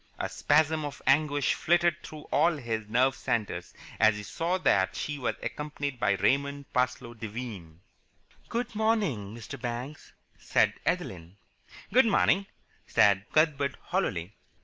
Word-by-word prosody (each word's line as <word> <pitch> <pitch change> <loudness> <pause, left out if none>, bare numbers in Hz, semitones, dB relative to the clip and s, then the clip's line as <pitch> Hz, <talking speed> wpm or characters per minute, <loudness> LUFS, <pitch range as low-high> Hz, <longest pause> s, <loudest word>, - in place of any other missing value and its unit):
A - - -3
spasm 155 +1 +2
of 145 -1 -6
anguish 145 +1 +3
flitted 175 0 +2
through 155 -1 -10
all 165 +1 +3
his 110 -5 -3
nerve 130 +4 +3
centres 100 -9 -2 0.3
as 110 -1 +5
he 105 - -6
saw 165 - -1
that 95 - +2
she 145 +6 -4
was 125 - -1
accompanied 145 +1 -4
by 100 -4 +3
Raymond 140 +8 0
Parsloe 125 -1 -1
Devine. 105 -7 -7 0.7
"Good 240 +1 -2
morning, 200 - 0
Mr. 115 -2 -9
Banks," 125 +4 -6 0.3
said - - +2
Adeline. 85 +1 -3 0.6
"Good 250 0 +6
morning," 195 -2 +3 0.4
said 100 0 +3
Cuthbert 145 -3 +2
hollowly. 100 - -2
130 Hz, 130 wpm, -28 LUFS, 105-155 Hz, 0.7 s, Good